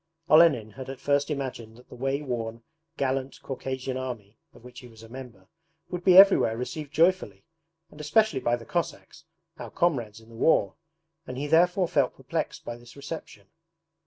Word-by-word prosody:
Olenin 155 -9 +5
had 130 +4 -9
at 135 -1 -7
first 140 +1 +1
imagined 125 -6 -5
that 125 - -18
the - - -14
way 135 +3 -2
worn, 115 -3 -4 0.3
gallant 135 0 -2
Caucasian 130 -1 -4
Army 120 -5 -6 0.2
(of - - -19
which 125 0 -11
he 125 - -12
was 115 -1 -15
a - - -11
member) 115 -6 -11 0.4
would 180 -1 -4
be 185 0 +6
everywhere 190 - +7
received 145 +4 -5
joyfully, 175 +4 +1 0.5
and 150 - -11
especially 155 0 +2
by 120 -1 +1
the 115 -1 -10
Cossacks, 170 -1 -4 0.3
our - - -7
comrades 120 - -1
in 110 0 -19
the 115 - -14
war; 160 +8 +2 0.5
and 130 - -6
he 140 - -3
therefore 175 +4 +3
felt 145 -7 +1
perplexed - - -4
by 120 - -6
this 120 -1 -16
reception. 140 -9 -9
130 Hz, 175 wpm, -27 LUFS, 120-155 Hz, 0.5 s, everywhere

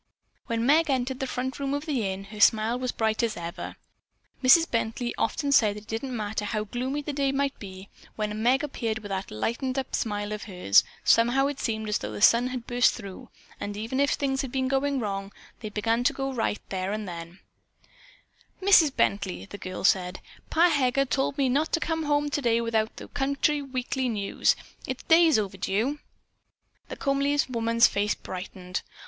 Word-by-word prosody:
When 230 0 -1
Meg 310 +4 +4
entered 260 -1 0
the 265 - -2
front 260 +1 -3
room 280 0 -1
of 285 +1 -4
the 255 -10 -1
inn, 190 +1 -6
her 210 - -8
smile 220 +3 +4
was 255 - -2
as - - -2
bright 220 -1 +1
as 230 -2 -1
ever. 170 0 -6 0.7
Mrs. 325 +6 +7
Bently 230 +1 -2
often 280 +6 -1
said 215 -6 +4
that 210 - -8
it - - -23
didn't 240 +3 -4
matter 210 0 -3
how 210 +1 -2
gloomy 255 +7 -3
the 295 - -4
day 275 -1 +1
might 275 0 -1
be, 190 -1 -9 0.3
when 210 0 -3
Meg 255 +5 +3
appeared 230 -6 -2
with 210 -2 -8
"that 195 0 -3
lighten' 235 - -2
up" 265 - -3
smile 205 -1 -2
of 210 0 -5
hers, 180 - +4 0.2
somehow 240 +4 +4
it 285 -1 -2
seemed 220 -2 -2
as 210 - 0
though 105 - -5
the 105 - -5
sun 235 - +5
had 250 -2 -5
burst 245 0 +3
through, 200 -5 -9 0.3
and 205 0 -5
even 225 +5 -3
if 280 0 +3
things 270 -2 0
had 270 -3 -5
been 260 0 0
going 275 +1 0
wrong, 195 -3 -3 0.3
they 215 - -6
began 225 +3 0
to - - +3
go 270 0 -3
right 225 -3 -2
then 190 0 -2
and 215 -1 -4
there. 170 0 -8 1.2
"Mrs. 370 -6 +6
Bently," 200 -7 -1
the 205 - -9
girl 185 0 -6
said, 185 -2 +2 0.3
"Pa 340 +2 +4
Heger 275 -2 +2
told 270 +1 -1
me 275 -2 +2
not 285 +5 +1
to - - +3
come 325 -1 -2
home 290 0 +1
today 235 -6 +1
without 225 -1 0
the - - -9
County 285 +2 0
Weekly 260 -1 -2
News. 205 -3 +1 0.3
It's 260 -1 -4
days 325 -3 +5
overdue." 210 +7 -1 0.9
The - - -5
comely 280 +1 0
woman's 230 -1 +3
face 205 +1 +1
brightened. 185 0 -6
235 Hz, 190 wpm, -27 LUFS, 210-275 Hz, 1.2 s, Mrs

